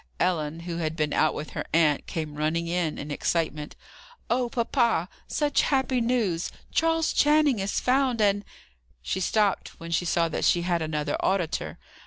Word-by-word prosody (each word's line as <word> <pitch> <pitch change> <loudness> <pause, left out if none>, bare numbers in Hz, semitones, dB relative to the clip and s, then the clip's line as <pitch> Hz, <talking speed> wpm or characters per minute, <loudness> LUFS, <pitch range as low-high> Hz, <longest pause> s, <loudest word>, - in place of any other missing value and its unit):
Ellen, 165 -3 0
who 170 0 -5
had 160 -2 -2
been 150 -2 -1
out 155 - +2
with 150 - -6
her - - -4
aunt, 155 -4 +3
came 155 -2 -4
running 155 +3 -1
in, 170 -2 -1
in 145 +1 -6
excitement. 155 -1 -2 0.6
"Oh, 245 0 +1
papa! 235 - +1 0.2
such 295 -1 +1
happy 265 -2 +1
news! 225 -8 0 0.2
Charles 325 0 +2
Channing 295 -5 +4
is 195 +1 -1
found, 255 -2 +1
and 205 -1 +2 0.3
" - - -38
She 130 - -2
stopped 205 +1 0
when 165 0 -8
she 170 +2 +1
saw 170 -1 +2
that - - -3
she 175 - +3
had 175 -1 0
another 150 -2 -2
auditor. 185 -4 -1
175 Hz, 170 wpm, -26 LUFS, 155-235 Hz, 0.6 s, Channing